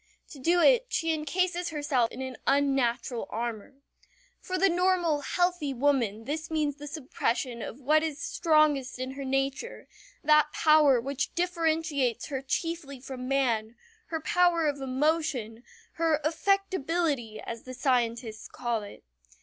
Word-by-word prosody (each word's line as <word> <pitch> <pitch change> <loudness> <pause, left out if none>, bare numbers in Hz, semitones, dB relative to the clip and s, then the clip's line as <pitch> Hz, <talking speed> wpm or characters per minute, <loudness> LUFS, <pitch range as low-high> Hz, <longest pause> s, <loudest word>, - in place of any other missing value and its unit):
To 285 - -11
do 340 +7 +3
it - - +5
she 325 -1 0
incases 355 +3 -1
herself 290 -6 0
in 260 - -6
an 260 -1 -6
unnatural 265 -4 +1
armor. 230 +2 -4 0.6
For 370 - -3
the 390 +2 +4
normal, 350 -4 +2
healthy 350 -4 0
woman 240 -5 +1
this 310 +3 -4
means 300 -3 -1
the 295 0 -8
suppression 255 -4 -2
of 240 - -7
what 305 +3 +3
is 310 -2 -3
strongest 305 -7 +2
in 255 +1 -4
her 275 +1 -6
nature, 270 - -2 0.4
that 300 0 +4
power 305 -5 +5
which 270 +2 -3
differentiates 320 -8 0
her 270 -2 -3
chiefly 285 0 -3
from 255 -1 -7
man, 240 -5 0 0.3
her 325 - -3
power 340 +1 +2
of 285 -1 -2
emotion, 265 -4 -1 0.4
her 325 -2 +2
"affectability" 330 - 0
as 230 -1 -6
the 255 0 -9
scientists 235 -4 -1
call 240 -3 -2
it. 205 - -11
285 Hz, 140 wpm, -28 LUFS, 255-325 Hz, 0.6 s, it